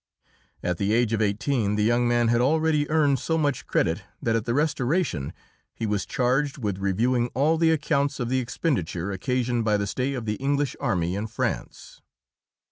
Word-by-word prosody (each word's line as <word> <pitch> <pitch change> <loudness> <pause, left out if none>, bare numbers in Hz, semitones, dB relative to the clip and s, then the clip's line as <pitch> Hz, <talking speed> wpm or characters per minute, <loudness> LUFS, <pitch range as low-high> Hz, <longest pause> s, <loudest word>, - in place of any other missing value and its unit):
At 90 -1 -1
the 100 +2 +1
age 115 -1 +2
of 110 - +1
eighteen 105 +1 0
the 105 - +1
young 120 +2 +2
man 120 -1 +2
had 120 0 +3
already 155 +2 +2
earned 145 -4 +3
so 160 +6 -1
much 145 -3 -1
credit - - +1 0.2
that 115 -1 0
at 115 0 -1
the 120 0 -1
Restoration 145 - 0 0.4
he 115 - -3
was 105 -2 -1
charged 135 +2 0
with 105 -7 -3
reviewing 120 +6 +1
all 150 +5 +3
the 165 -1 +4
accounts 145 -2 +1
of 120 - -1
the 130 +2 +1
expenditure 100 - -2
occasioned 120 +4 -1
by 105 -1 +2
the 100 - -1
stay 130 +7 -2
of 120 -3 -5
the 105 -1 -2
English 140 +1 0
army 90 -10 0
in 105 +2 -3
France. - - -4
120 Hz, 185 wpm, -25 LUFS, 105-140 Hz, 0.4 s, the